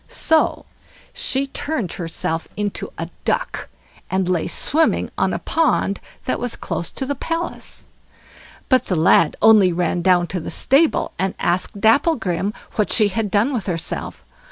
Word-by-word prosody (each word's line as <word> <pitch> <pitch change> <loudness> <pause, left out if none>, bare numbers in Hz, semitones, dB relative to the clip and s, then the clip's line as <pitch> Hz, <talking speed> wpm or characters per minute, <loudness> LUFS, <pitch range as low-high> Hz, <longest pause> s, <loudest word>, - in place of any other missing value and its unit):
So 320 -1 +1 0.5
she 270 +1 0
turned 275 - -3
herself 165 -1 -3
into 205 -1 -3
a - - -4 0.2
duck, - - -2 0.4
and 190 -1 0
lay 180 -3 0
swimming 320 +3 +1
on - - +1
a - - -1
pond 310 -11 0 0.3
that 255 - -1
was 245 -1 -2
close 170 - -4
to 265 - -3
the 285 - -1
palace. 330 +4 -4 0.8
But 260 -1 +2
the 185 - 0
lad 160 0 +4
only 210 -4 +6
ran 175 0 0
down 180 -1 +3
to 185 - -1
the 160 - -6
stable, 290 +5 +2
and 190 0 -1
asked 180 +3 -1
Dapplegrim 220 - +2 0.3
what 210 - +1
she 215 -3 +5
had 210 +2 -2
done 215 +8 +2
with 230 -6 -3
herself. 170 -2 -4
205 Hz, 155 wpm, -20 LUFS, 180-265 Hz, 0.8 s, only